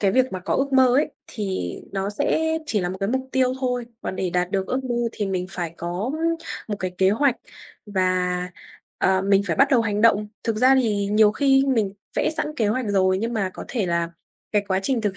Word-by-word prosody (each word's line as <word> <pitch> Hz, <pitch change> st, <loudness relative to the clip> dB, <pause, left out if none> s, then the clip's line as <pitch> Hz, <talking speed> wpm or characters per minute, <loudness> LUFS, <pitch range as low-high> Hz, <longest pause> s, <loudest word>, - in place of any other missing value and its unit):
cái 195 Hz, -2 st, +2 dB
việc 255 Hz, +3 st, +2 dB
mà 185 Hz, -, -4 dB
có 180 Hz, -, -2 dB
ước 275 Hz, +1 st, 0 dB
mơ 260 Hz, -1 st, +6 dB
ấy, 295 Hz, -, +2 dB, 0.2 s
thì 190 Hz, -, -3 dB, 0.2 s
nó 195 Hz, 0 st, -2 dB
sẽ 320 Hz, +9 st, 0 dB
chỉ 215 Hz, -7 st, +1 dB
là 175 Hz, -, -1 dB
một 185 Hz, -, -5 dB
cái 195 Hz, -, 0 dB
mục 260 Hz, +2 st, -2 dB
tiêu 255 Hz, -1 st, +2 dB
thôi, 250 Hz, -2 st, -1 dB, 0.2 s
còn -, -, -4 dB
để 185 Hz, -1 st, -1 dB
đạt 180 Hz, +1 st, 0 dB
được 190 Hz, -1 st, -1 dB
ước 265 Hz, +1 st, -2 dB
mơ 245 Hz, -, -2 dB, 0.2 s
thì 205 Hz, -, -3 dB
mình 185 Hz, -2 st, -2 dB
phải 170 Hz, -3 st, -3 dB
có, 175 Hz, +8 st, -3 dB
ơ, -, -, -4 dB, 0.5 s
một 205 Hz, -, -2 dB
cái 185 Hz, -, -2 dB
kế 190 Hz, 0 st, +4 dB
hoạch 255 Hz, +4 st, +2 dB, 0.5 s
và, 185 Hz, -2 st, 0 dB, 0.5 s
ờ, 190 Hz, 0 st, +2 dB
mình 195 Hz, 0 st, +3 dB
phải 170 Hz, -, -1 dB
bắt 275 Hz, -, +5 dB
đầu 255 Hz, -4 st, +5 dB
hành 210 Hz, -2 st, -1 dB
động. 210 Hz, -2 st, +4 dB, 0.2 s
Thực 225 Hz, -2 st, 0 dB
ra 255 Hz, +4 st, +5 dB
thì 205 Hz, -3 st, 0 dB
nhiều 210 Hz, 0 st, +4 dB
khi 270 Hz, +2 st, +3 dB
mình 225 Hz, -7 st, +1 dB, 0.2 s
vẽ -, -, +2 dB
sẵn 315 Hz, -, -1 dB
kế 220 Hz, -, +1 dB
hoạch 245 Hz, +3 st, -1 dB
rồi, 190 Hz, -2 st, +2 dB
nhưng 230 Hz, +3 st, -2 dB
mà 200 Hz, -5 st, -1 dB
có -, -, -7 dB
thể 225 Hz, -7 st, -1 dB
là 170 Hz, -1 st, 0 dB, 0.4 s
cái 210 Hz, -1 st, +3 dB
quá 190 Hz, 0 st, +1 dB
trình 250 Hz, +3 st, +2 dB
thực 205 Hz, -3 st, -2 dB
205 Hz, 235 wpm, -23 LUFS, 190-250 Hz, 0.5 s, mơ